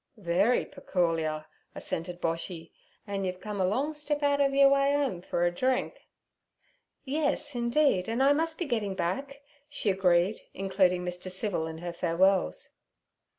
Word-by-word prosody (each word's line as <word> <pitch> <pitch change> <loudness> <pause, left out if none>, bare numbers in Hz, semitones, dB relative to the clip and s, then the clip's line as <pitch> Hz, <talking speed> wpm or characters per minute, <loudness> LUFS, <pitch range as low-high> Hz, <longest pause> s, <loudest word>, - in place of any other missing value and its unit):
'Very 195 +5 +2
pecoorial' 165 - -1 0.3
assented 175 +1 -3
Boshy. 165 0 -3 0.3
'An' 200 -1 -3
you've 185 -1 -3
come 205 0 -4
a - - +3
long 270 +10 0
step 295 0 -2
out 285 0 +3
ov 275 -1 +3
yur 275 0 +6
way 275 +1 +3
'ome 270 -11 -1
fer 175 - -1
a 175 - +2
drink.' 255 +7 -1 1.0
'Yes, 290 +1 -1
indeed, 235 -4 +2
and 235 +4 +1
I 280 +1 +6
must 320 +2 0
be 350 - -2
getting 220 -8 -1
back' 275 +12 -3 0.3
she 220 -7 0
agreed, 185 +1 +2
including 185 -2 +1
Mr. 180 +1 -4
Civil 185 -3 -1
in 160 0 -7
her 175 - -3
farewells. 175 - +1
195 Hz, 150 wpm, -29 LUFS, 175-275 Hz, 1.0 s, yur